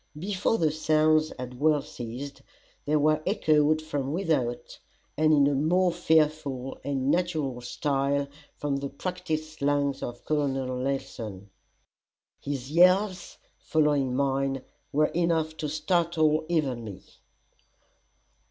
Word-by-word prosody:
Before 195 +5 0
the 160 -5 +2
sounds 155 0 +2
had 125 -1 -7
well 150 -1 +3
ceased, 125 +4 -7 0.4
they 150 - +1
were 155 +1 +3
echoed 155 -5 +2
from 145 -3 -3
without 150 -9 -1 0.4
and 155 +1 +3
in 145 0 +3
more 180 +1 +3
fearful 155 -6 0
and 135 0 0
natural 155 -8 -1
style 140 +2 -1 0.3
from 145 -1 -1
the 140 0 -4
practised 155 -1 -4
lungs 140 -1 +1
of 120 0 -6
Col. 150 -2 +1
Nelson. 125 -6 -4 0.9
His 140 -1 -5
yells 185 +3 +3 0.2
following 145 -5 +1
mine, 135 -1 0 0.3
were 150 +2 +3
enough 165 -2 0
to 150 - -3
startle 155 0 +1
even 140 -8 0
me. 100 -4 -9
150 Hz, 115 wpm, -27 LUFS, 135-155 Hz, 0.9 s, well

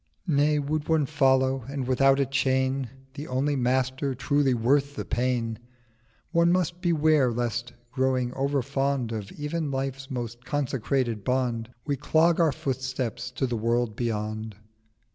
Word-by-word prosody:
940 160 - 0 0.2
'Nay, - - +2
would 150 +2 -2
one 160 -2 +3
follow, 130 -2 +2
and 140 -2 -3
without 135 +2 +4
a 140 - +3
Chain, 130 -1 0 0.2
The 145 +1 -7
only 135 +3 0
Master 130 +1 0
truly 140 0 +2
worth 140 +5 +2
the - - -4
Pain, 120 -2 -1 0.7
One 170 0 +4
must 175 -1 0
beware 155 -6 +3
lest, 120 +1 -2 0.2
growing 130 -1 0
over 140 0 0
fond 135 -2 -1
Of 105 -3 -5
even 150 +1 -3
Life's 135 0 -3
more 120 -3 -3
consecrated 130 -5 -1
Bond, 120 -2 0 0.2
We 145 -2 -1
clog 165 +5 +3
our 165 -3 +4
Footsteps 130 -3 -3
to 135 - -1
the 120 -2 -2
World 115 0 0
beyond. 110 -2 -3
130 Hz, 145 wpm, -26 LUFS, 120-145 Hz, 0.7 s, without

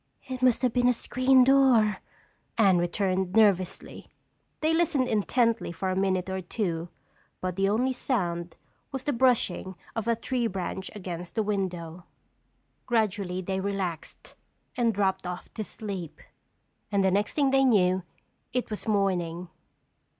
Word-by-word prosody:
"It 255 -1 -5
must 255 0 +3
have 250 -2 +2
been 245 -1 +3
a 250 - +5
screen 255 +2 +3
door," 250 -6 +4 0.6
Anne 195 -6 +5
returned 185 +1 -1
nervously. 195 -4 +1 0.5
They 315 +1 +2
listened 300 -6 +2
intently 230 0 +1
for 185 +2 -2
a - - -1
minute 185 -1 0
or 190 0 -3
two 175 -3 -3 0.5
but 185 -1 -3
the 195 +1 +2
only 250 +5 +1
sound 175 -10 -2 0.4
was 270 -2 -4
the 290 - 0
brushing 230 -7 +1 0.2
of 225 -1 -3
a 235 - +3
tree 240 +1 -1
branch 190 -1 -4
against 180 -3 -6
the 220 - +1
window. 180 -4 -3 0.8
Gradually 205 -6 0
they 190 +1 -2
relaxed 190 -4 -4 0.4
and 235 -2 +2
dropped 195 -3 0
off 180 0 -7
to 220 - -4
sleep. 195 -6 -7 0.7
And 200 -1 +2
the 190 - +3
next 205 +2 0
thing 280 -3 +3
they 270 0 +4
knew 190 -7 +3 0.5
it 250 -2 -2
was 215 - -5
morning. 180 -4 0
200 Hz, 145 wpm, -27 LUFS, 185-240 Hz, 0.8 s, a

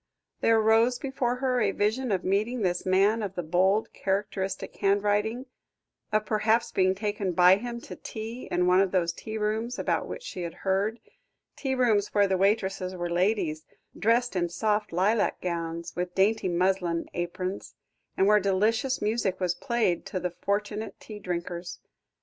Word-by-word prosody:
There 225 -1 +4
rose 225 +3 +4
before 265 -2 -1
her 250 -1 0
a 210 - +3
vision 220 +5 0
of 185 -2 0
meeting 215 +5 0
this 175 0 -1
man 200 +4 +3
of 195 -2 -4
the 175 - -3
bold, 190 +6 +1
characteristic 195 -1 -2
handwriting 205 +5 +1 0.7
of 215 0 +1
perhaps 220 +2 +1
being 185 0 +2
taken 205 -2 -2
by 180 +2 +6
him 235 +2 -5
to - - -9
tea 225 +2 -7
in 180 - +1
one 180 +1 +5
of 195 - +2
those 175 -2 +1
tea 220 +5 -6
rooms 220 +3 -1
about - - -1
which - - -7
she 185 - -6
had 170 -1 -5
heard 200 +4 +1 0.6
tea 265 -2 -2
rooms 220 -6 +2
where 205 -1 +5
the 190 - +1
waitresses 190 -1 0
were 175 -1 -3
ladies, 175 -4 0 0.3
dressed 235 +1 +1
in 175 -1 0
soft 210 +4 0
lilac 200 +6 +1
gowns, 170 -1 -4
with 180 0 -3
dainty 205 +1 +2
muslin 175 -1 0
aprons, 180 +2 -4 0.4
and 190 - +4
where 210 +1 +5
delicious 215 +7 +1
music 210 -3 0
was 180 -2 +1
played 205 -1 0
to 185 - -3
the 180 0 -2
fortunate 210 +4 -3
tea 215 -2 -9
drinkers. 175 -1 -5
200 Hz, 165 wpm, -27 LUFS, 180-220 Hz, 0.7 s, by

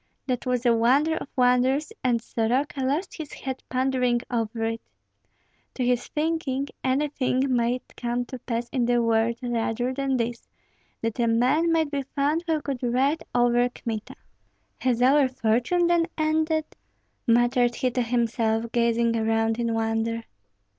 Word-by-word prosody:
That 255 -1 -2
was 250 0 0
a 240 - +5
wonder 265 +8 +3
of - - -5
wonders, 255 - +2
and 245 -2 +2
Soroka 260 +5 -1
lost 295 +8 -1
his 315 -3 -7
head 265 -1 -5
pondering 255 -2 +1
over 225 -1 -2
it. 225 0 -2 0.9
To 255 - -1
his 245 -1 +1
thinking, 300 -3 -1
anything 265 -1 +1
might 240 +1 -1
come 245 0 -2
to 255 +1 -8
pass 235 0 -3
in 250 -2 0
the 240 0 +3
world 230 0 +2
rather 240 +1 -1
than 270 -1 0
this, 235 0 -3 0.6
that 230 +1 -2
a 235 - +2
man 260 +9 +3
might 320 -3 +1
be 285 -1 -1
found 295 +4 +1
who 315 -3 0
could 270 -4 -4
ride 265 +5 +1
over 245 0 +3
Kmita. 225 -3 -6 0.6
"Has 245 -2 +1
our 275 +1 +5
fortune 250 +8 +1
then 340 -1 +3
ended?" 315 0 +1 0.6
muttered 240 +1 +3
he 255 -2 0
to 250 +1 0
himself, 230 -1 0
gazing 235 -1 +2
around 225 0 +1
in 235 -1 0
wonder. 225 0 -1
245 Hz, 150 wpm, -25 LUFS, 235-275 Hz, 0.9 s, a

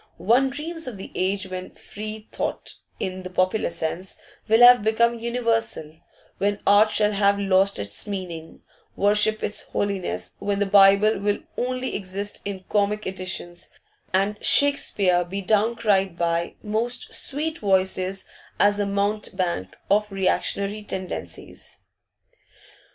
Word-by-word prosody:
One 235 +10 +3
dreams 320 +3 -5
of 240 -5 -6
the 190 - -9
age 190 +1 -1
when 185 0 -7
free 215 +1 -8
thought - - -4 0.3
in 185 0 -4
the 185 - -7
popular 185 +4 0
sense 170 +2 -4 0.3
will 225 +2 +4
have 245 -2 +8
become 235 +2 +2
universal, 230 -9 -1 0.4
when 205 0 0
art 205 +2 +6
shall 210 0 +2
have 200 0 +2
lost 195 0 +2
its 100 - -1
meaning, 175 -5 -6 0.3
worship 210 +1 +2
its 210 - -1
holiness, 185 - -3
when 200 0 -1
the 205 - +1
Bible 200 +2 +5
will 205 +1 0 0.2
only 255 +1 -2
exist 200 +1 -5
in 195 -2 -5
'comic' 210 0 0
editions, 185 -2 -4 0.4
and 200 +2 0
Shakespeare 200 -11 +3
be 195 +3 -5
down 215 +4 +2
cried 195 -6 +1
by 170 0 -1
'most 225 +3 -1
sweet 310 +3 -3
voices 190 -1 0 0.3
as 205 0 +3
a 205 - 0
mountebank 200 - -2 0.2
of 210 +1 +2
reactionary 200 +2 -1
tendencies. 190 -3 -7
200 Hz, 130 wpm, -24 LUFS, 185-215 Hz, 0.4 s, have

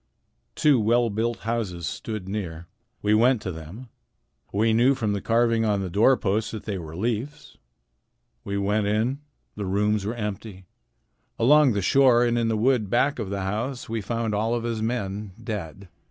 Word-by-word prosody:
Two 145 -5 +4
well 115 +1 +2
built 115 +3 -2
houses 105 -7 -3
stood 105 +4 -5
near. 90 -5 -5 0.4
We 105 +1 +3
went 120 +3 +4
to 95 - -3
them. 85 +10 -10 0.6
We 110 +3 +2
knew 125 +5 +4
from 110 -5 -1
the 100 - -2
carving 115 0 +2
on 105 -3 +1
the 95 -2 -4
door 115 +7 +4
posts 105 +1 -1
that 110 - -7
they 100 -3 -4
were 80 -1 -8
Leif's. 120 - -4 0.9
We 100 0 -3
went 100 +1 0
in. 110 +6 0 0.4
The 100 -2 -4
rooms 105 +2 +1
were 110 +4 -3
empty. 105 -3 -6 0.7
Along 140 +2 +5
the 100 -2 -1
shore 125 0 +5
and 120 0 +1
in 115 -1 +1
the 110 -1 0
wood 115 -2 +2
back 135 +4 +1
of 105 -4 -3
the 100 0 -3
house 115 +7 -3
we 115 -1 -2
found 115 +1 -2
all 110 +3 0
of 120 - -3
his 115 -2 -2
men, 105 -3 -3
dead. 100 -4 -6
110 Hz, 180 wpm, -25 LUFS, 100-120 Hz, 0.9 s, Along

